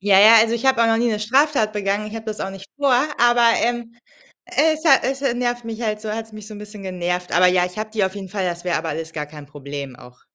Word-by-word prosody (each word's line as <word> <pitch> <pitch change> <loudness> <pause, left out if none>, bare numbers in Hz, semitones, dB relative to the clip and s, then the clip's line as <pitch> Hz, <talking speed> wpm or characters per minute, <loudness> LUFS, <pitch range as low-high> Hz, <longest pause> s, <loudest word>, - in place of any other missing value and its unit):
Ja, 195 -1 +4
ja, 220 +2 +8
also 230 +1 +2
ich 235 +3 -4
habe 265 -2 +3
auch - - +4
noch 225 0 +2
nie 240 +1 +1
'ne 215 -2 -1
Straftat 255 0 +2
begangen, 205 0 -2
ich 215 - -8
habe 225 0 -7
das 215 -1 -4
auch 195 - -3
nicht 195 0 -11
vor, 280 -3 +2 0.2
aber, 240 0 +4 0.2
ähm, 240 -1 -3 0.5
es 315 +1 +1
ha 275 -4 +6
es, 270 +1 -2
äh, 265 -4 +1
nervt 245 -1 -2
mich 230 +1 -6
halt 210 -2 -2
so 215 0 -5
hat's 225 0 -6
mich 215 -1 -10
so 215 - -9
'n - - -9
bisschen 210 -1 -10
genervt. 180 -1 -3
Aber 180 +2 +5
ja, 180 0 +2
ich 180 +3 -10
habe 215 0 -4
die 215 -3 0
auf 190 +1 -3
jeden 195 -2 -7
Fall. 195 0 -3
Das 175 -1 -4
wäre 175 -3 0
aber 160 0 -4
alles 160 0 -5
gar 150 -1 -4
kein 150 -1 -12
Problem, 140 -2 -8
auch 125 0 -16
215 Hz, 285 wpm, -21 LUFS, 180-235 Hz, 0.5 s, ja